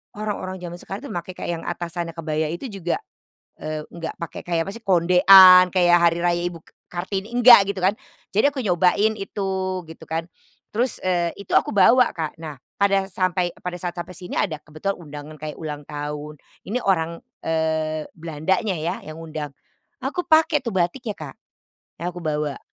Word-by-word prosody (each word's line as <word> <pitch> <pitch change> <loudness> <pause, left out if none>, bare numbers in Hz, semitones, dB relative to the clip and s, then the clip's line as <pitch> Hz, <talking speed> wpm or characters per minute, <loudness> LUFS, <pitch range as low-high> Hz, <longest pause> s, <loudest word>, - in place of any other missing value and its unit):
orang-orang 205 -3 -4
zaman 175 0 -6
sekarang 195 +3 -7
tuh - - -7
make 180 +1 -5
kayak 170 -2 -4
yang - - -11
atasannya 170 -1 -4
kebaya 155 -1 -1
itu 175 - -5
juga, 185 -3 -2 0.6
eee, 155 0 -4
enggak 170 -1 -6
pakai 170 - -7
kayak 170 -2 +1
apa - - -4
sih, 230 - -10
kondean 185 +1 +8
kayak 175 -1 +5
hari 170 0 +3
raya 175 0 +2
Ibu 170 -2 -6
K - - -24 0.2
Kartini, 195 +5 -4
enggak, 240 -4 +8
gitu 195 -2 -3
kan. 195 +3 +2 0.3
Jadi 215 +7 +3
aku 265 - -2
nyobain 200 +3 +2
itu 195 0 -4 0.4
gitu 160 - -12
kan. 160 +1 -2 0.5
Terus, 240 +2 -1
eee, 175 -2 0
itu 200 - -12
aku - - -4
bawa 250 +5 +5
Kak 160 -1 -4
nah 155 -2 -7 0.2
pada 195 -1 +2
sampai 180 -1 0
k - - -19
pada 180 0 -5
saat 175 0 -4
sampai 175 +1 -6
sini 180 0 -5
ada 160 -4 -1
kebetulan 155 +7 -3
undangan 150 -1 -9
kayak 155 -1 -6
ulang 150 -2 -5
tahun 150 +1 -6 0.2
ini 220 +6 -2
orang, 170 -3 +1 0.2
eee, 160 -1 -1
Belandanya 170 +5 -1
ya 160 +2 -2
yang 155 +1 -9
undang, 155 -2 -6 0.5
aku 360 - -2
pakai 315 -2 +4
tuh 235 - -2
batiknya 195 +6 -1
Kak, 145 -4 -8 0.7
yang 175 +1 -2
aku 175 - -7
bawa. 150 -2 -2
175 Hz, 180 wpm, -23 LUFS, 160-195 Hz, 0.7 s, kondean